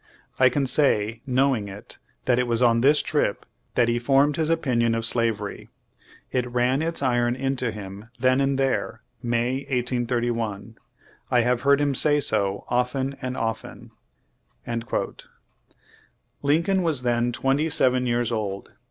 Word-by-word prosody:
I 130 Hz, -1 st, +6 dB
can 140 Hz, +2 st, 0 dB
say, 115 Hz, -5 st, +3 dB
knowing 130 Hz, -4 st, +1 dB
it, 100 Hz, +1 st, -11 dB, 0.3 s
that 125 Hz, -1 st, +2 dB
it 125 Hz, -, 0 dB
was 120 Hz, +1 st, +1 dB
on 115 Hz, -1 st, +4 dB
this 145 Hz, +3 st, +4 dB
trip 150 Hz, -9 st, -1 dB, 0.3 s
that 120 Hz, -2 st, +3 dB
he 120 Hz, 0 st, +1 dB
formed 140 Hz, +4 st, +3 dB
his 160 Hz, 0 st, -1 dB
opinion 120 Hz, -8 st, +1 dB
of 115 Hz, 0 st, -2 dB
slavery. 115 Hz, -3 st, 0 dB, 0.6 s
It 125 Hz, -1 st, -1 dB
ran 125 Hz, +3 st, +1 dB
its 165 Hz, -2 st, -2 dB
iron 120 Hz, -1 st, +1 dB
into 130 Hz, -2 st, -2 dB
him 105 Hz, 0 st, -9 dB
then 130 Hz, +2 st, +2 dB
and 135 Hz, 0 st, +1 dB
there, 130 Hz, -4 st, -1 dB, 0.2 s
May, 120 Hz, +1 st, 0 dB
1831. 120 Hz, -4 st, -2 dB, 0.5 s
I 125 Hz, -, +3 dB
have 120 Hz, 0 st, +1 dB
heard 140 Hz, +1 st, +4 dB
him 145 Hz, -1 st, +1 dB
say 145 Hz, +2 st, +3 dB
so 100 Hz, -7 st, 0 dB
often 130 Hz, +2 st, -1 dB
and 130 Hz, 0 st, -4 dB
often." 115 Hz, -1 st, -5 dB, 0.7 s
2 115 Hz, -1 st, -3 dB, 1.6 s
Lincoln 165 Hz, +7 st, +2 dB
was 155 Hz, -7 st, 0 dB
then 120 Hz, 0 st, +1 dB
twenty 135 Hz, +6 st, 0 dB
seven 125 Hz, -3 st, +1 dB
years 120 Hz, -1 st, 0 dB
old. 100 Hz, -4 st, -4 dB
125 Hz, 145 wpm, -24 LUFS, 115-135 Hz, 1.6 s, I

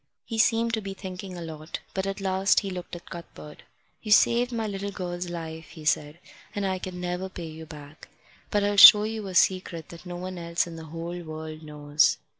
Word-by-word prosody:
He 225 Hz, -2 st, -4 dB
seemed 230 Hz, +1 st, +3 dB
to 220 Hz, -, 0 dB
be 195 Hz, -1 st, -6 dB
thinking 185 Hz, -1 st, -7 dB
a 170 Hz, -, -6 dB
lot, 155 Hz, 0 st, -7 dB
but 190 Hz, 0 st, -2 dB
at 195 Hz, +1 st, -3 dB
last 190 Hz, 0 st, +2 dB
he 195 Hz, -2 st, -4 dB
looked 180 Hz, -1 st, -6 dB
at 175 Hz, -, -12 dB
Cuthbert. 170 Hz, -3 st, -10 dB, 0.4 s
"You've 210 Hz, -1 st, +6 dB
saved 240 Hz, +2 st, +3 dB
my 225 Hz, -2 st, -2 dB
little 200 Hz, -1 st, -3 dB
girl's 180 Hz, -2 st, -5 dB
life," 160 Hz, -2 st, -6 dB
he 155 Hz, -2 st, -12 dB
said, 150 Hz, +1 st, +1 dB, 0.4 s
"and 205 Hz, -1 st, -1 dB
I 190 Hz, -1 st, -1 dB
can 180 Hz, -1 st, -6 dB
never 180 Hz, +1 st, -3 dB
pay 175 Hz, -2 st, -7 dB
you 160 Hz, 0 st, -9 dB
back. 150 Hz, -1 st, -12 dB, 0.4 s
But 205 Hz, -1 st, +1 dB
I'll 205 Hz, 0 st, +1 dB
show 210 Hz, +1 st, +11 dB
you 220 Hz, -1 st, -4 dB
a 185 Hz, -, -6 dB
secret 170 Hz, -3 st, +2 dB
that 170 Hz, +2 st, -11 dB
no 175 Hz, -, -5 dB
one 185 Hz, 0 st, -6 dB
else 170 Hz, 0 st, 0 dB
in 170 Hz, -1 st, -9 dB
the 160 Hz, 0 st, -8 dB
whole 165 Hz, +2 st, -6 dB
world 155 Hz, -1 st, -7 dB
knows." 150 Hz, -1 st, +2 dB
180 Hz, 215 wpm, -26 LUFS, 160-195 Hz, 0.4 s, show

